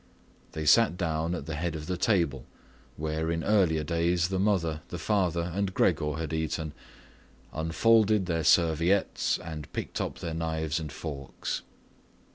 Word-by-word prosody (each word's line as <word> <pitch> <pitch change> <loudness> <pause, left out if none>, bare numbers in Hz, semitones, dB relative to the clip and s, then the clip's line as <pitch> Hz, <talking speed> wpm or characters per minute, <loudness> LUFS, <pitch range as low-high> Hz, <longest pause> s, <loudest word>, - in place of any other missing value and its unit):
They 80 -1 -4
sat 90 +3 +5
down 85 -1 -1
at 75 - -6
the 80 - -4
head 80 +1 -2
of 75 -1 -5
the 90 - -2
table, 85 - +1 0.5
where 80 +1 -2
in 85 0 -1
earlier 90 -7 +3
days 85 +2 +1
the 95 -1 -1
mother, 85 -6 +1
the 85 - -6
father, 85 -2 0
and 95 0 -1
Gregor 75 0 +2
had 80 0 -4
eaten, 80 -1 -2 0.8
unfolded 105 +6 +3
their 85 -2 -1
serviettes, 85 +4 +3
and 80 -3 -8
picked - - -3
up - - -3
their 85 - -4
knives 80 -1 -1
and 75 -3 -6
forks. 70 -3 -5
80 Hz, 150 wpm, -28 LUFS, 80-90 Hz, 0.8 s, sat